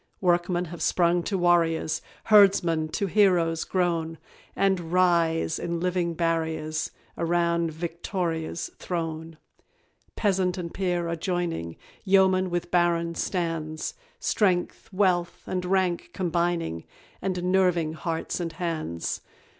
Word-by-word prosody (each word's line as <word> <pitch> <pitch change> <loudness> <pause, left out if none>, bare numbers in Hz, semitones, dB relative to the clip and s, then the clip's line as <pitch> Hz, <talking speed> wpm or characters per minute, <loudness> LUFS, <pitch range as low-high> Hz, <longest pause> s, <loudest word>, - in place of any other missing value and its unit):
Workmen 175 0 +1
have 170 0 -9
sprung 175 0 +2
to 200 - -1
warriors, 165 -3 +2 0.2
Herdsmen 195 -7 +5
to 200 - -1
heroes 175 -5 +3
grown, 165 -3 -1 0.4
And 190 -4 +1
rise, 170 -3 +2
in 170 0 -2
living 175 -1 0
barriers, 160 -2 -1 0.3
Around 170 -1 +1
VICTORIA'S 170 0 -3
throne. 165 -2 -4 0.8
Peasant 190 -3 +1
and 170 -2 -5
peer 175 -3 -1
are 170 - -1
joining, 170 - -3 0.3
Yeoman 190 -1 +4
with 175 0 -3
baron 170 -1 +2
stands; 165 -3 -2 0.3
Strength, 185 - 0
wealth, 185 -3 +1
and 180 -1 -3
rank 185 -2 0
combining, 170 - -1 0.4
And 185 -2 -2
nerving 175 -4 +2
hearts 165 +2 -3
and 165 -2 -3
hands. 155 - -3
175 Hz, 110 wpm, -26 LUFS, 165-180 Hz, 0.8 s, Herdsmen